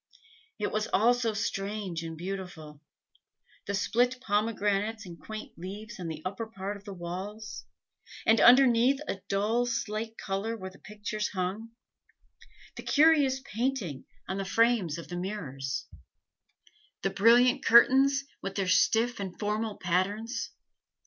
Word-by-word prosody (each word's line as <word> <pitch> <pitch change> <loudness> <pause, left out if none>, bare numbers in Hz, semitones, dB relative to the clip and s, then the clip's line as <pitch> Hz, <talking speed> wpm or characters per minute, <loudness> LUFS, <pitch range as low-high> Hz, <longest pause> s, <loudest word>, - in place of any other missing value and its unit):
It 210 - -2
was 215 0 -1
all 230 +5 +4
so 235 -3 -1
strange 200 -4 -3
and 165 -1 -6
beautiful 175 -5 -7 0.9
the 200 - -1
split 245 +5 +1
pomegranates 210 -1 0
and 170 -2 -10
quaint 215 0 -7
leaves 210 +5 -8
on 175 - -4
the 155 -1 -6
upper 200 +5 -4
part 200 -1 -5
of 200 0 -13
the 200 - -7
walls, 190 +5 -6 0.6
and 225 +1 +5
underneath 250 +1 +6
a 195 - -4
dull 220 +5 +1
slate 225 -1 -3
color 205 +4 -3
where 190 -2 -7
the 190 - -18
pictures 210 0 -4
hung; 200 +4 -4 1.0
the - - -5
curious 290 -4 +4
painting 230 - -3 0.2
on 190 +1 -3
the - - -1
frames 205 -5 +2
of 170 - -8
the 175 - -5
mirrors; 150 -8 -4 1.2
the 195 - +1
brilliant 245 +6 +5
curtains, 270 +4 +6 0.2
with 195 0 -5
their 195 -2 -1
stiff 225 +6 +3
and 190 -3 -5
formal 215 0 -2
patterns. 200 +6 -1
210 Hz, 135 wpm, -29 LUFS, 190-230 Hz, 1.2 s, underneath